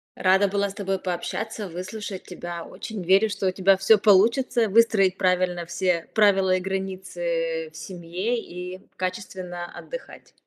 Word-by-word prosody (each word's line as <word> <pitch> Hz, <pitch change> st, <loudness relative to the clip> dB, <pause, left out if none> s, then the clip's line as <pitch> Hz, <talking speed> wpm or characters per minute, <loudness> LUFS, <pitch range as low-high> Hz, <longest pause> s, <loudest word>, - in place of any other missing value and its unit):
Рада 190 Hz, +1 st, +3 dB
была 200 Hz, 0 st, 0 dB
с -, -, -9 dB
тобой 195 Hz, -2 st, -2 dB
пообщаться, 200 Hz, +3 st, -4 dB
выслушать 185 Hz, +3 st, -6 dB
тебя. 175 Hz, -2 st, -7 dB
Очень 220 Hz, -3 st, -7 dB
верю, 190 Hz, +5 st, +4 dB
что 200 Hz, -2 st, -2 dB
у -, -, +2 dB
тебя 190 Hz, +1 st, +3 dB
всё 195 Hz, +3 st, +5 dB
получится! 225 Hz, +4 st, +4 dB
Выстроить 200 Hz, -3 st, +4 dB
правильно 180 Hz, -2 st, +1 dB
все 170 Hz, 0 st, -1 dB
правила 195 Hz, -3 st, +4 dB
и -, -, -2 dB
границы 470 Hz, -, -3 dB
в -, -, -13 dB
семье 185 Hz, +6 st, -3 dB
и 180 Hz, -2 st, -8 dB, 0.2 s
качественно 185 Hz, -2 st, -4 dB
отдыхать. -, -, -10 dB
190 Hz, 145 wpm, -25 LUFS, 180-215 Hz, 0.2 s, всё